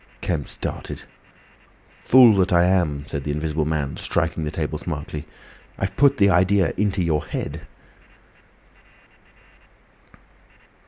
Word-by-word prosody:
Kemp -, -, -3 dB
started. -, -, -6 dB, 0.8 s
"Fool 125 Hz, -4 st, +5 dB
that 95 Hz, 0 st, +2 dB
I 85 Hz, -1 st, +5 dB
am!" 85 Hz, -6 st, +1 dB
said 70 Hz, -2 st, -5 dB
the 75 Hz, -, -5 dB
Invisible 75 Hz, +1 st, -1 dB
Man, 75 Hz, -3 st, -2 dB
striking 80 Hz, -1 st, -1 dB
the -, -, -2 dB
table 75 Hz, -1 st, -4 dB
smartly. 75 Hz, -1 st, -6 dB, 0.5 s
"I've 95 Hz, -, -3 dB
put 140 Hz, -1 st, +4 dB
the 100 Hz, -1 st, +4 dB
idea 95 Hz, +1 st, +3 dB
into 100 Hz, -2 st, 0 dB
your 80 Hz, -2 st, 0 dB
head." -, -, -6 dB
85 Hz, 115 wpm, -22 LUFS, 75-95 Hz, 0.8 s, Fool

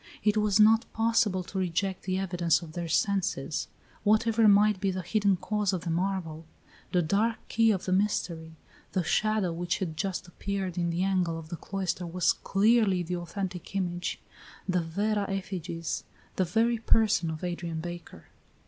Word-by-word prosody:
It 210 Hz, 0 st, +3 dB
was 210 Hz, -1 st, +2 dB
not 220 Hz, +1 st, +5 dB
possible 225 Hz, -4 st, +2 dB
to 190 Hz, +2 st, -5 dB
reject 185 Hz, +1 st, -1 dB
the 185 Hz, -1 st, 0 dB
evidence 175 Hz, -3 st, +1 dB
of 160 Hz, -, -9 dB
their 170 Hz, +1 st, -4 dB
senses. 195 Hz, +3 st, 0 dB, 0.4 s
Whatever 220 Hz, +1 st, +4 dB
might 205 Hz, -1 st, +5 dB
be 195 Hz, -, +1 dB
the 185 Hz, -1 st, -3 dB
hidden 200 Hz, +1 st, +2 dB
cause 210 Hz, +1 st, -1 dB
of 180 Hz, -, -1 dB
the 170 Hz, -, -2 dB
marvel, 170 Hz, -3 st, -2 dB, 0.4 s
the 180 Hz, -2 st, +2 dB
dark 210 Hz, +8 st, +1 dB
key 225 Hz, 0 st, +3 dB
of 190 Hz, -3 st, 0 dB
the 185 Hz, -, -2 dB
mystery, 175 Hz, -5 st, 0 dB, 0.4 s
the 185 Hz, -, +1 dB
shadow 215 Hz, -1 st, +1 dB
which 175 Hz, +1 st, -1 dB
had 165 Hz, -5 st, -3 dB
just 185 Hz, +2 st, -3 dB
appeared 190 Hz, 0 st, -4 dB
in 175 Hz, -1 st, 0 dB
the 170 Hz, +2 st, 0 dB
angle 180 Hz, -4 st, +1 dB
of 160 Hz, -1 st, -9 dB
the 170 Hz, -, -4 dB
cloister 185 Hz, -1 st, -3 dB
was 180 Hz, +1 st, +2 dB
clearly 200 Hz, -2 st, +2 dB
the 180 Hz, +1 st, -3 dB
authentic 180 Hz, +1 st, -5 dB
image, 175 Hz, -2 st, -2 dB, 0.5 s
the 180 Hz, -2 st, +1 dB
vera 200 Hz, +5 st, -1 dB
effigies, 180 Hz, -4 st, -4 dB, 0.3 s
the 185 Hz, -, +1 dB
very 225 Hz, +6 st, +1 dB
person 220 Hz, -6 st, +3 dB
of 160 Hz, +1 st, -6 dB
Adrian 175 Hz, -2 st, -3 dB
Baker. 175 Hz, -, -8 dB
185 Hz, 165 wpm, -28 LUFS, 175-205 Hz, 0.5 s, not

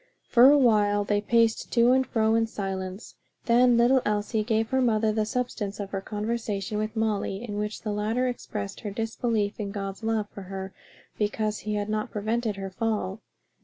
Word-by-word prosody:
For 245 Hz, +2 st, +7 dB
a 290 Hz, -, +6 dB
while 210 Hz, -5 st, +3 dB
they 205 Hz, 0 st, 0 dB
paced 230 Hz, +1 st, +2 dB
to 235 Hz, 0 st, +5 dB
and 260 Hz, 0 st, +3 dB
fro 220 Hz, -1 st, +2 dB
in 225 Hz, 0 st, +2 dB
silence; 195 Hz, -1 st, -5 dB, 0.3 s
then 240 Hz, 0 st, +5 dB
little 250 Hz, +2 st, +4 dB
Elsie 210 Hz, +1 st, 0 dB
gave 220 Hz, 0 st, 0 dB
her 260 Hz, 0 st, +2 dB
mother 220 Hz, -3 st, +2 dB
the 215 Hz, 0 st, 0 dB
substance 215 Hz, -5 st, -3 dB
of 200 Hz, -1 st, -5 dB
her 195 Hz, -, -2 dB
conversation 210 Hz, -1 st, -3 dB
with 215 Hz, +1 st, -3 dB
Molly 215 Hz, -1 st, -1 dB
in 205 Hz, -1 st, -4 dB
which 210 Hz, 0 st, -4 dB
the 215 Hz, -, -2 dB
latter 220 Hz, +5 st, 0 dB
expressed 210 Hz, -5 st, -5 dB
her 210 Hz, -, -5 dB
disbelief 225 Hz, 0 st, -1 dB
in 205 Hz, -2 st, -3 dB
God's 195 Hz, 0 st, -5 dB
love 220 Hz, -2 st, 0 dB
for 200 Hz, -, -9 dB
her 190 Hz, 0 st, -6 dB, 0.5 s
because 215 Hz, 0 st, -1 dB
he 210 Hz, 0 st, -3 dB
had 205 Hz, 0 st, -2 dB
not 215 Hz, 0 st, -2 dB
prevented 220 Hz, +1 st, -1 dB
her 195 Hz, -1 st, -6 dB
fall. 215 Hz, -1 st, -2 dB
215 Hz, 185 wpm, -26 LUFS, 205-230 Hz, 0.5 s, For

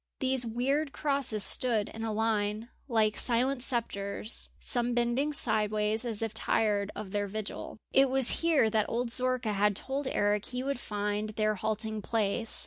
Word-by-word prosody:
These 260 Hz, -2 st, +2 dB
weird 275 Hz, +6 st, 0 dB
crosses 275 Hz, -8 st, 0 dB
stood 225 Hz, -5 st, +1 dB
in 225 Hz, -, -7 dB
a 225 Hz, -, -2 dB
line 215 Hz, 0 st, -1 dB, 0.2 s
like 220 Hz, -4 st, +2 dB
silent 250 Hz, +2 st, +2 dB
spectres, 220 Hz, -4 st, -2 dB
some 240 Hz, 0 st, -1 dB
bending 240 Hz, +5 st, +1 dB
sideways, 215 Hz, -3 st, +1 dB
as 225 Hz, -2 st, -2 dB
if 225 Hz, -, -3 dB
tired 205 Hz, -2 st, +1 dB
of 195 Hz, -3 st, -6 dB
their 205 Hz, 0 st, -1 dB
vigil. 215 Hz, +1 st, -6 dB, 0.2 s
It 270 Hz, 0 st, +5 dB
was 265 Hz, -1 st, +3 dB
here 325 Hz, -8 st, +4 dB
that 215 Hz, -1 st, +1 dB
old 235 Hz, +1 st, -1 dB
Zorka 255 Hz, -3 st, +1 dB
had 205 Hz, 0 st, +2 dB
told 270 Hz, +5 st, -2 dB
Eric 205 Hz, -4 st, +1 dB
he 250 Hz, 0 st, -3 dB
would 275 Hz, -2 st, -2 dB
find 210 Hz, 0 st, -2 dB
their 215 Hz, 0 st, 0 dB
halting 215 Hz, +1 st, -2 dB
place. 220 Hz, +1 st, +1 dB
225 Hz, 160 wpm, -30 LUFS, 210-255 Hz, 0.2 s, It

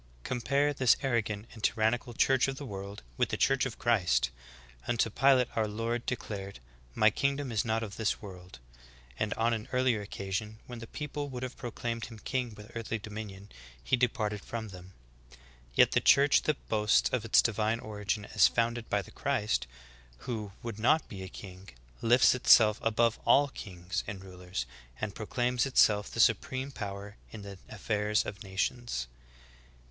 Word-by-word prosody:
11. -, -, -28 dB
Compare 140 Hz, +4 st, +1 dB
this 130 Hz, -3 st, +4 dB
arrogant 110 Hz, -5 st, -1 dB
and 110 Hz, -3 st, -12 dB
tyrannical 115 Hz, +2 st, +1 dB
church 135 Hz, +2 st, +3 dB
of 135 Hz, -, -2 dB
the 145 Hz, -, -6 dB
world 100 Hz, -, -7 dB
with -, -, +1 dB
the -, -, -2 dB
Church 135 Hz, 0 st, +2 dB
of 120 Hz, -, -9 dB
Christ. 85 Hz, -, +2 dB, 0.6 s
Unto 115 Hz, -2 st, +1 dB
Pilate 130 Hz, +1 st, +4 dB
our 110 Hz, -1 st, +1 dB
Lord 115 Hz, +3 st, -3 dB
de 125 Hz, -, +1 dB
clared, 100 Hz, -4 st, -7 dB, 0.4 s
"My 110 Hz, 0 st, +5 dB
kingdom 140 Hz, +2 st, -1 dB
is 110 Hz, -2 st, +1 dB
not 115 Hz, -1 st, 0 dB
of 100 Hz, -2 st, -7 dB
this 110 Hz, -2 st, 0 dB
world 90 Hz, -6 st, -11 dB, 0.2 s
,"^ -, -, -23 dB, 0.4 s
and 110 Hz, -, 0 dB
on 115 Hz, +1 st, +2 dB
an 110 Hz, +1 st, -4 dB
earlier 125 Hz, -4 st, +2 dB
occasion, 100 Hz, +2 st, -4 dB
when 120 Hz, -1 st, -8 dB
the 115 Hz, -, -8 dB
people 150 Hz, +1 st, -5 dB
w 135 Hz, -3 st, -7 dB
ould 125 Hz, -, -4 dB
have 130 Hz, 0 st, -5 dB
proclaimed 115 Hz, -1 st, -4 dB
Him 115 Hz, -2 st, -10 dB
king 125 Hz, 0 st, -3 dB
with 105 Hz, +3 st, -13 dB
earthly 115 Hz, -1 st, -3 dB
dominion,^ 105 Hz, -2 st, -8 dB, 0.3 s
He 130 Hz, -, +2 dB
departed 110 Hz, -4 st, 0 dB
from 110 Hz, -2 st, -5 dB
them. 90 Hz, 0 st, -12 dB, 0.8 s
Yet -, -, +6 dB
the -, -, +2 dB
Church 140 Hz, +1 st, +5 dB
that 155 Hz, -2 st, -1 dB
boasts 105 Hz, -1 st, +3 dB
of 125 Hz, -4 st, 0 dB
its 115 Hz, -, +4 dB
divine 110 Hz, 0 st, +1 dB
origin 105 Hz, -1 st, -3 dB
as 105 Hz, -, +7 dB
founded 115 Hz, 0 st, -1 dB
by 100 Hz, -1 st, +1 dB
the -, -, -14 dB
Christ, 105 Hz, -, -1 dB, 0.6 s
who 110 Hz, -4 st, -4 dB
would 115 Hz, -3 st, -5 dB
not 145 Hz, +8 st, +3 dB
be 95 Hz, -3 st, -7 dB
a 95 Hz, -, -6 dB
king, 95 Hz, -1 st, -11 dB, 0.3 s
lifts 120 Hz, +2 st, +5 dB
itself 110 Hz, -4 st, +6 dB
above 115 Hz, 0 st, +2 dB
all 140 Hz, +1 st, +5 dB
kings 90 Hz, -5 st, -5 dB
and 100 Hz, -1 st, -6 dB
rulers, 90 Hz, -7 st, -5 dB, 0.3 s
and 110 Hz, -2 st, -3 dB
proclaims 120 Hz, +4 st, 0 dB
itself 105 Hz, -5 st, +4 dB
the -, -, -7 dB
supreme 130 Hz, +1 st, +2 dB
power 100 Hz, -2 st, -6 dB
in 105 Hz, -2 st, -9 dB
the 100 Hz, -2 st, -9 dB
affairs 105 Hz, 0 st, 0 dB
of 100 Hz, -, -6 dB
nations. 95 Hz, -, -2 dB
110 Hz, 175 wpm, -30 LUFS, 100-120 Hz, 0.8 s, as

